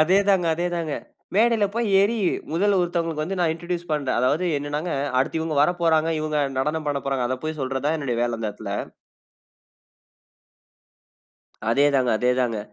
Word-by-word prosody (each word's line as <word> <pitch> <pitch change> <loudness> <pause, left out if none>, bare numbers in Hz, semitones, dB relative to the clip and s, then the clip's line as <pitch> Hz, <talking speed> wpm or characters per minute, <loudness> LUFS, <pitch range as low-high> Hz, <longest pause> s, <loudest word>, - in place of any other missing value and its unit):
அதே 175 +5 +4
தாங்க. 185 -3 +3
அதே 175 +2 -2
தாங்க. 160 -3 -2 0.4
மேடைல 225 -2 +4
போய் 235 -1 0
ஏறி, 210 +4 +2 0.4
முதல்ல 195 +3 +2
ஒருத்தவங்களுக்கு 165 -3 -1
வந்து 190 +2 -4
நான் 165 -2 +2
இன்ட்ரடியூஸ் 175 0 -5
பண்ணுறேன். 140 -5 0
அதாவது 145 +8 +1
என்னன்னாங்க, 150 +4 -3 0.3
அடுத்து 160 +4 -1
இவங்க 160 -2 -2
வரப்போறாங்க, 165 -1 +2
இவங்க 155 -1 -1 0.2
நடனம் 150 +2 -1
பண்ண 140 -1 -1
போறாங்க. 130 -3 0
அத 130 - -1
போய் 155 -1 -3
சொல்றது 135 +1 -2
தான் 160 +2 +1
என்னுடைய 125 -5 -2
வேல 120 -1 0
அந்த 110 - -1
இடத்தில 100 -1 -7 3.0
அதே 140 +5 +4
தாங்க. 130 -2 +3
அதே 125 0 +2
தாங்க. 115 -3 0
155 Hz, 160 wpm, -24 LUFS, 135-175 Hz, 3.0 s, அதே